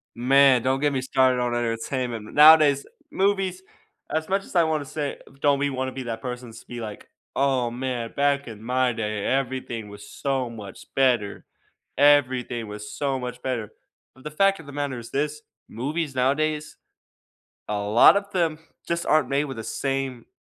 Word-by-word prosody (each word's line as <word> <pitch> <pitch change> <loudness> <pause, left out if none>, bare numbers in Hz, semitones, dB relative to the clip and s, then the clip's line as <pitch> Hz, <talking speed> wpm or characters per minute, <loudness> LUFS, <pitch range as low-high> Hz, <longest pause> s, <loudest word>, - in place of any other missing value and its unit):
Man, 130 +1 +5
don't 130 +2 0
get 145 0 +2
me 135 -2 -1
started 130 -1 +2
on 120 -1 0
entertainment. 115 -1 -2
N - - -12
Nowadays, 150 -2 +7 0.3
movies, 190 -1 0 0.5
as 160 0 -1
much 195 +1 0
as - - -14
I 170 - +6
wanna 155 -2 0
say 145 +1 -4 0.2
don't 140 -1 +3
be-wanna 130 -2 -1
be 130 - -5
that 115 -2 -5
person's 125 -2 -7
to - - -18
be 120 -1 -7
like, 105 -3 -8 0.3
"Oh 130 -3 +1
man, 120 -2 -3
back 140 -1 +1
in 110 -2 -9
my 125 +2 +1
day 105 -3 -3
everything 130 -4 -2
was 100 0 -11
so 135 -3 -2
much 105 -4 -11
better. 120 -7 +1 0.5
Everything 130 -5 +3
was 105 0 -8
so 135 -2 -2
much 125 -1 -6
better," 120 -5 -3 0.4
but 130 - -19
the 150 - -5
fact 195 +4 +2
of 165 - -11
the 145 - -10
matter 140 -3 -3
is 115 - -11
this, 150 +2 -2 0.3
movies 145 +5 -3
nowadays, 150 +4 0 0.9
a 105 -1 -2
lot 105 - +6
of 200 0 -2
them 165 -5 0 0.3
just 170 0 -1
aren't 150 -4 +3
made 140 +2 +1
with 135 -4 -7
the 115 - -5
same 135 -1 -3
130 Hz, 175 wpm, -24 LUFS, 120-145 Hz, 0.9 s, Nowadays